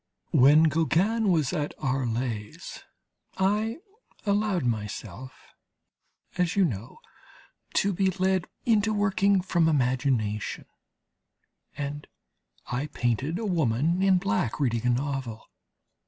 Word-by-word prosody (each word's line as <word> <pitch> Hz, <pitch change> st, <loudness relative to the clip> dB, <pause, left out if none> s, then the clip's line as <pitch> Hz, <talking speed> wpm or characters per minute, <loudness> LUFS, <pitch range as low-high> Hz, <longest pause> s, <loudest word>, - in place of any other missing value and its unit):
When 145 Hz, +5 st, +6 dB
Gauguin 180 Hz, +7 st, +2 dB
was 155 Hz, -6 st, +1 dB
at 145 Hz, -1 st, -2 dB
Arles 120 Hz, -5 st, -3 dB, 0.5 s
I 210 Hz, +5 st, +1 dB, 0.5 s
allowed 200 Hz, -6 st, +1 dB
myself, 110 Hz, +1 st, -4 dB, 1.1 s
as 180 Hz, -2 st, +1 dB
you 200 Hz, -2 st, +4 dB
know, 115 Hz, -, -5 dB, 0.8 s
to 200 Hz, 0 st, +2 dB
be 190 Hz, +1 st, +2 dB
led 185 Hz, 0 st, 0 dB, 0.2 s
into 220 Hz, -2 st, +2 dB
working 200 Hz, -1 st, +2 dB
from 175 Hz, -3 st, +2 dB
imagination, 125 Hz, -6 st, 0 dB, 1.1 s
and 145 Hz, +1 st, -5 dB, 0.6 s
I 130 Hz, +4 st, -3 dB
painted 135 Hz, +5 st, -1 dB
a 225 Hz, -, -4 dB
woman 165 Hz, -, +1 dB
in 190 Hz, -1 st, +4 dB
black 110 Hz, -, -1 dB
reading 120 Hz, -4 st, 0 dB
a -, -, +3 dB
novel. 130 Hz, -3 st, -2 dB
150 Hz, 105 wpm, -27 LUFS, 125-190 Hz, 1.1 s, When